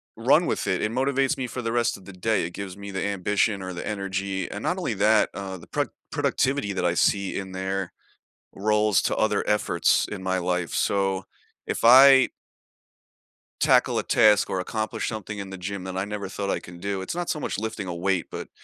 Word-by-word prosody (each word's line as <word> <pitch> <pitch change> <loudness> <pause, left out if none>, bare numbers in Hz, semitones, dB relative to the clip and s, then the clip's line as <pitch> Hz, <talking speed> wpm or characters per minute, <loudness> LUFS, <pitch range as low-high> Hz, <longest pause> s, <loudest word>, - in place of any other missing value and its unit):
run - - +4
with - - -2
it, - - 0
it 105 - 0
motivates 135 +2 +1
me 130 - -3
for 125 +1 -5
the 115 - -1
rest 120 -2 +1
of 95 - -17
the 100 - -10
day, 110 +4 0
it 85 - -6
gives 100 -1 -7
me 100 0 -8
the 95 - -3
ambition 100 +1 0
or 95 0 -5
the 85 - -6
energy, 95 -2 -3
and 105 - -5
not 180 - -1
only 175 -10 -2
that, 105 +2 +3
uh, 95 -1 -6
the 85 - -13
pro - - 0 0.3
productivity 135 -6 0
that 90 -2 -1
I 85 - +2
see 100 +2 +1
in 95 -1 -5
there 95 0 -3 0.6
rolls 105 0 +2
to - - 0
other 105 -2 +1
efforts 100 -5 +2
in 100 -3 -6
my 95 0 0
life, 90 -1 -1
so 95 -1 0 0.4
if - - -3
I 130 +2 +8 1.3
tackle - - +4
a - - -2
task 105 -2 +4
or 95 - -1
accomplish 110 +4 -3
something 105 -1 -5
in 100 -1 -6
the 95 - -7
gym 95 +1 -5
that 95 0 -5
I 95 - -1
never 105 -1 -5
thought 100 0 -4
I - - 0
can 85 -1 -12
do, 100 +1 -3
it's 95 - -5
not 175 -1 -3
so 150 - -1
much - - -3
lifting 110 -2 -4
a 90 - -4
weight, 90 0 0
but - - -6
100 Hz, 215 wpm, -25 LUFS, 95-110 Hz, 1.3 s, I